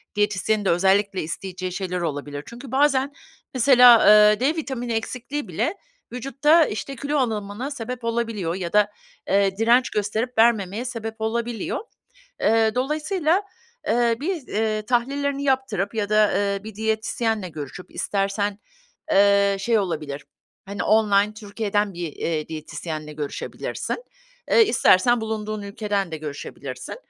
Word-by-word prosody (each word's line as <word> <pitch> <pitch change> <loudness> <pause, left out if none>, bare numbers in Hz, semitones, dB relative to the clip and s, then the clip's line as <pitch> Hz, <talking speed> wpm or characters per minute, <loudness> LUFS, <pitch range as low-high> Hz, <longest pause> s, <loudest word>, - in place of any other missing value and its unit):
diyetisyenin 210 0 0
de - - +2
özellikle 190 +2 +2
isteyeceği 185 +3 -5
şeyler 180 -1 -3
olabilir. 145 -2 -4
Çünkü 240 +2 -10
bazen 275 0 +2 0.4
mesela, 250 -2 +7 0.3
eee, 210 - 0
D 280 +6 +1
vitamini 260 -7 -3
eksikliği 255 +5 -4
bile - - -1 0.4
vücutta 280 +6 +3
işte 275 +5 -5
kilo 285 +3 -2
alımına 220 +1 -2
sebep 250 -2 -6
olabiliyor 230 -7 -2
ya 180 -2 -5
da, 210 0 +4 0.4
eee, 195 0 +2
direnç 235 +3 +4
gösterip 215 +4 -2
vermemeye 220 -1 +2
sebep 225 -3 -5
olabiliyor. 230 0 -2 0.6
Eee, 220 0 +3
dolayısıyla, 310 +7 0 0.4
eee, 235 0 +2
bir, 325 -3 -3
eee, 215 0 -1
tahlillerini 275 +4 0
yaptırıp 260 -7 0
ya 210 -2 -1
da, 215 0 +4
eee, 200 0 -1
bir 220 -1 -8
diyetisyenle 220 -1 -1
görüşüp 155 +2 -8
istersen, 200 0 -1 0.5
eee, 200 0 +4
şey, 230 +1 +2
olabilir. 150 -7 -3 0.4
Hani 200 +1 -4
online 210 -1 +3
Türkiye'den 205 -1 -2
bir, 170 -3 -5
eee, 155 -1 -3
diyetisyenle 155 0 -6
görüşebilirsin. 150 - -5 0.5
Eee, 460 - +7
istersen 240 - +4
bulunduğun 215 -1 -4
ülkeden 200 -2 -2
de - - -2
görüşebilirsin. 150 -2 -7
215 Hz, 130 wpm, -23 LUFS, 195-245 Hz, 0.6 s, mesela